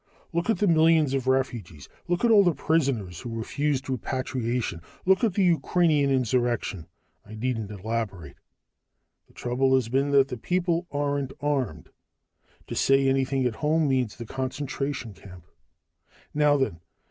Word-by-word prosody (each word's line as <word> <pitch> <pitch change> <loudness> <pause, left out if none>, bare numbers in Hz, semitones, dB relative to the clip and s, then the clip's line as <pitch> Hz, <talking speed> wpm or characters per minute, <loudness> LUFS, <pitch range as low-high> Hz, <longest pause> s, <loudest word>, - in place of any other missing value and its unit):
Look 170 +5 -1
at 225 - +3
the 210 - +1
millions 160 -4 +4
of 130 -2 -1
refugees, 120 - -1 0.2
look 175 +6 +1
at 235 - +4
all 205 -2 +7
the 175 -4 +2
prisoners 130 - 0
who 120 - -6
refused 140 +4 -1
repatriation, 125 -6 -2 0.2
look 190 +3 +3
at 215 -6 +2
the 200 - +3
Ukrainian 160 -3 +2
insurrection 120 -8 0 0.4
I 110 +1 -11
needn't 115 -2 -2
elaborate. 100 -6 -4 0.9
The - - -25
trouble 130 +2 +1
has 125 -4 0
been 135 +3 +1
that 140 -1 +4
the 125 - -4
people 175 +5 -1
aren't 145 -2 -2
armed. 135 - -2 0.8
To - - -7
say 135 0 +3
anything 135 0 +1
at 115 -3 -1
home 155 +1 +1
means 130 -5 0
the 115 - -8
concentration 135 -1 -4
camp. 90 -1 -14 0.9
"Now, 150 -1 +3
then. 130 -11 -1
135 Hz, 145 wpm, -26 LUFS, 115-150 Hz, 0.9 s, all